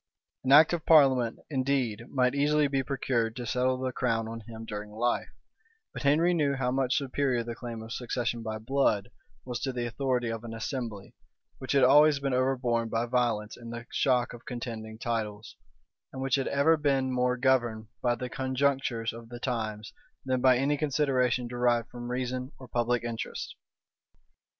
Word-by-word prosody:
An 130 - 0
act 155 +4 +8
of 170 -3 -1
parliament, 130 -7 +5
indeed, 130 -5 -1
might 125 -2 +2
easily 145 +1 +3
be 135 -1 0
procured 125 -4 -1
to 125 - -5
settle 125 +2 +1
the 130 0 -2
crown 115 -2 -1
on 115 0 -6
him 115 -1 -8
during 105 -1 -6
life; 120 +3 -1 0.6
but - - -6
Henry 155 +5 +3
knew 145 -4 +1
how 130 -2 -1
much 130 -1 +1
superior 135 -3 0
the 120 0 -5
claim 115 -1 -7
of 115 +1 -7
succession 120 -1 -2
by 110 -1 -4
blood 110 -3 +1 0.4
was 125 -1 -4
to 135 - -2
the 120 -1 -3
authority 125 -1 -1
of 115 0 -5
an 115 -1 -6
assembly,[*] 115 -4 -5 0.5
which 130 - -3
had 140 -2 +4
always 145 +3 +6
been 140 -1 -1
overborne 125 -3 +1
by 115 +1 0
violence 120 -4 0
in 115 -1 -10
the 120 0 -7
shock 125 -3 +1
of 120 0 -11
contending 115 -4 -6
titles, 110 -2 -4 0.6
and 130 - -8
which 135 -1 -2
had 135 -1 +2
ever 145 +4 +3
been 135 -3 +1
more 125 0 +1
governed 120 -4 +1 0.2
by 120 -1 +2
the 125 +1 -5
conjunctures 130 -3 -1
of 115 0 -11
the 120 0 -8
times, 110 -4 -3 0.3
than 130 -1 0
by 130 -1 +5
any 140 +3 +1
consideration 130 -4 +1
derived 120 -1 +1
from 120 0 -7
reason 125 +1 -3
or 130 - -11
public 120 0 0
interest. 115 -1 -5
125 Hz, 175 wpm, -29 LUFS, 115-135 Hz, 0.6 s, act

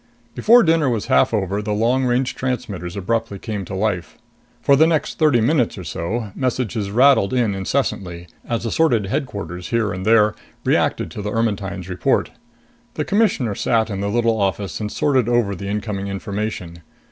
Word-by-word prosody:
Before 235 +2 +5
dinner 160 -4 +3
was 115 -4 -1
half 65 - +4
over, 100 -2 -1
the 105 0 -2
long 120 +5 +2
range 125 +1 +1
transmitters 105 -9 -4
abruptly 115 +1 -2
came 105 -2 -5
to 95 - -6
life. 95 -5 -2 0.4
For 140 - +4
the 160 +3 +5
next 160 -2 -1
thirty 150 -7 +4
minutes 125 -1 +1
or 95 - -6
so, 100 +7 -4
messages 125 -5 -2
rattled 125 -2 +4
in 115 -5 +1
incessantly, 95 -4 -2 0.2
as 115 0 -3
assorted 115 -4 +2
Headquarters 95 - -4
here 115 -4 0
and 90 +1 -5
there 110 -1 +4 0.3
reacted - - +1
to - - -6
the 105 +1 -3
Ermetyne's 100 -5 -2
report. 90 -1 0 0.6
The - - -2
Commissioner 195 - +1
sat 110 +1 0
in 100 -1 -3
the 100 - -1
little 115 0 +1
office 100 -2 -1
and 105 -1 -4
sorted 130 -5 +1
over 120 -4 +2
the 100 +1 -6
incoming 100 -1 -3
information. 100 -3 -4
110 Hz, 170 wpm, -20 LUFS, 100-125 Hz, 0.6 s, Before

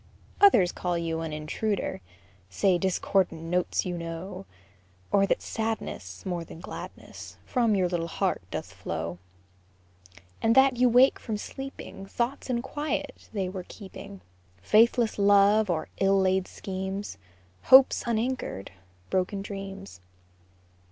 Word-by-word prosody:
Others 235 - +6
call 175 -1 -2
you 165 -1 -2
an 160 -1 -4
intruder, 155 - -2 0.5
Say 180 - +2
discordant 190 -2 0
notes 180 +2 0
you 175 -1 -3
know; 170 +3 -6 0.6
Or 195 -1 +4
that - - 0
sadness, 220 - -4
More 175 -2 -2
than 165 - -11
gladness, - - -9
From 235 -4 +2
your 185 -2 +2
little 175 -1 -2
heart - - -1
doth - - -5
flow; 85 +2 -5 1.2
And 225 +1 +3
that 265 -1 +6
you 250 +1 +5
awake 250 +3 +5
from 220 -3 -4
sleeping 270 -5 -8
Thoughts 245 +7 -2
in 240 -1 0
quiet 290 +1 -4
they 195 -4 -2
were 185 -1 -6
keeping, 200 -1 -10 0.4
Faithless 225 - +4
love, 205 +1 +5
or 160 -3 -1
ill 195 0 +4
laid 190 0 +2
schemes, 190 - -5 0.5
Hopes 265 0 +7
unanchored 230 - -2 0.4
broken 190 +2 0
dreams. 195 - -8
195 Hz, 125 wpm, -27 LUFS, 175-225 Hz, 1.2 s, Hopes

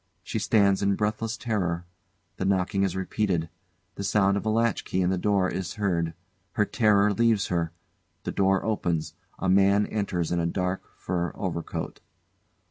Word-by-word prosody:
She 110 - -3
stands 100 -2 +3
in 100 0 +2
breathless 110 +2 -1
terror. 90 -7 -1 0.5
The 95 - -2
knocking 95 0 +1
is 95 -2 +1
repeated. 95 -3 -1 0.4
The 100 - -6
sound 100 -1 +3
of 100 - -1
a - - +3
latchkey 115 -4 +1
in 90 0 +2
the 95 - +1
door 100 -1 +2
is 95 -1 -4
heard. 85 -6 0 0.4
Her 105 - +2
terror 105 -2 +3
leaves 110 -1 +2
her. 85 -2 0 0.5
The - - -3
door 95 0 +2
opens; 85 -7 -1 0.2
a 95 - -2
man 100 +2 +4
enters 95 -6 -2
in 85 - +1
a 85 - +1
dark, 90 +2 -2
fur 90 -1 -2
overcoat. 85 -4 -4
95 Hz, 160 wpm, -27 LUFS, 90-105 Hz, 0.5 s, man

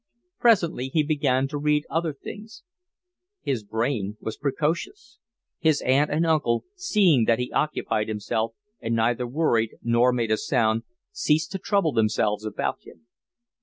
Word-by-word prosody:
Presently 175 - +3
he 155 +3 +1
began 140 -3 +1
to 145 0 -4
read 150 0 +1
other 165 0 -1
things. 210 +9 -10 0.8
His 125 -6 -1
brain 110 -1 -2
was 110 - -5
precocious. 170 - -3 0.4
His 155 -3 +3
uncle 130 - +4 0.2
and 160 +3 +1
aunt, 150 -8 +1
seeing 200 - +3
that 115 0 +3
he 125 +1 -3
occupied 110 -7 -1
himself 110 +1 -2 0.2
and 115 0 -2
neither 120 +2 +1
worried 120 -5 +1
nor 120 +2 +3
made 115 -3 -1
a 110 - +3
noise, 115 -4 +2 0.3
ceased 160 -5 +1
to 195 - -4
trouble 195 -4 +1
themselves 110 -2 +1
about 110 - -2
him. - - -17
135 Hz, 145 wpm, -25 LUFS, 115-160 Hz, 0.8 s, uncle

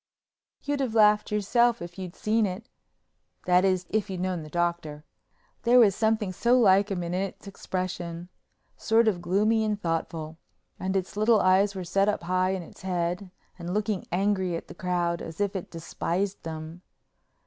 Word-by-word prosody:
You'd 290 0 -1
have 250 -5 -2
laughed 210 -1 +4
yourself 235 +3 +2
if 175 0 -9
you'd 185 -1 -7
seen 215 0 +1
it—that 185 -2 -4
is, 185 -2 +1
if 215 -1 0
you'd 185 -2 -4
known 185 -2 -2
the 155 - -9
Doctor. 170 -3 -2 0.6
There 240 +2 +4
was 220 -5 +6
something 220 -3 0
so 240 +6 +3
like 200 -2 +5
him 185 -3 -2
in 170 0 -4
its 190 +2 -3
expression—sort 185 +4 -3
of 185 -5 +1
gloomy 210 +5 +2
and 210 -1 -1
thoughtful—and 165 +2 -5
its 185 -1 -2
little 215 +1 +4
eyes 195 +2 +3
set 195 +3 +2
up 205 - -2
high 185 +1 +1
in 190 -2 -2
its - - -15
head 180 0 -2 0.3
and 175 +2 -4
looking 210 -2 -1
angry 190 -1 0
at 165 - -6
the - - -8
crowd 175 -1 -1
as 165 +2 -8
if 205 -1 0
it 190 - -5
despised 180 +3 -3
them. 160 +1 -7
190 Hz, 160 wpm, -27 LUFS, 175-210 Hz, 0.6 s, was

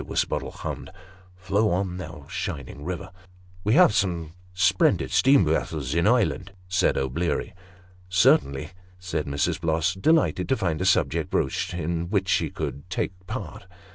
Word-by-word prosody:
Wisbottle - - -1
hummed, - - -6 0.3
" 90 0 -26
Flow 100 +3 +2
on, 90 0 -1
thou 90 - -8
shining 70 0 -5
river." 85 0 -5 0.3
" 90 0 -25
We 105 +4 +2
have 180 -10 +6
some 85 -5 -1 0.2
splendid 90 0 +2
steam 135 -7 +5
vessels 75 -3 -1
in 85 +4 +2
Ireland," 105 -4 +1
said 90 0 +2
O'Bleary. 70 +4 -1 0.3
" 90 0 -27
Certainly," 75 -5 +3 0.3
said 90 -5 -3
Mrs. 70 +3 -1
Bloss, 80 +2 +1
delighted 95 - +2
to 130 - +2
find 85 -2 -1
a - - 0
subject 95 - +2
broached - - -1
in 85 0 -2
which 95 -2 0
she - - +2
could 70 +6 -6
take 90 - -1 0.2
part. 90 - -6
90 Hz, 155 wpm, -25 LUFS, 80-95 Hz, 0.3 s, have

